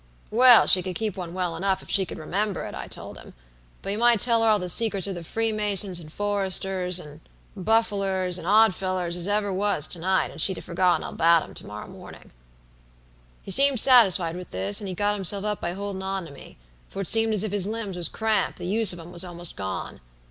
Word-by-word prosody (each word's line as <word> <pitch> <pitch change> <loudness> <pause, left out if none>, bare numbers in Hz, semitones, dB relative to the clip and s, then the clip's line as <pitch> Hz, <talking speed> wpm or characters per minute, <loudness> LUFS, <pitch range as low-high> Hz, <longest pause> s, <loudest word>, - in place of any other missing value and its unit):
"'Well, 245 +1 +7
she 185 - +5
could 185 -1 -6
keep 215 -4 -3
one 175 -3 -7
well 180 -3 -3
enough 190 +2 -2
if - - -15
she 190 -3 +3
could - - -8
remember 195 +6 -3
it,' - - -8
I - - -7
told - - -9
him; - - -15 0.5
'but 195 - -4
you 205 - -3
might 240 -1 +3
tell 230 0 +2
her 225 - +2
all 215 - +4
the 180 -2 -5
secrets 200 +1 +2
of 200 - -3
the 175 -2 -8
Freemasons, 210 -2 -2
and 155 -2 -12
Foresters, 190 -2 -2
and 150 -2 -12 0.4
Buffalers 195 -3 0
and 170 - -9
Oddfellers 185 -4 +1
as 175 +1 -2
ever 205 -1 -1
was, 195 -6 +1
to 175 - -1
night: 190 +2 0
and - - -5
she'd 190 - +3
have - - -8
forgotten 180 0 0
all - - -7
about 165 0 +3
'em - - -13
to - - -7
morrow 105 +1 -9
mornin'.' - - -14 1.1
"He - - -6
seemed 275 +3 +6
satisfied 195 -10 +4
with 180 0 -9
this, 95 +2 +1
and 200 - -6
he 185 - -5
got 205 +2 0
himself 200 0 -1
up 210 -1 -3
by 175 - -3
holdin' 200 0 -6
on 190 -1 -4
to 160 - -12
me, 140 - -14 0.3
for 195 - -6
it - - -5
seemed 225 -1 +4
as 205 - +4
if 215 - -3
his 200 -2 +2
limbs 215 -3 -5
was 175 -2 -1
cramped, 220 -3 -1
the 180 - -8
use 210 +2 +3
of 175 - -9
'em 165 +1 -11
was 175 0 +3
almost 175 -1 -7
gone. 95 -8 -6
190 Hz, 230 wpm, -24 LUFS, 175-210 Hz, 1.1 s, Well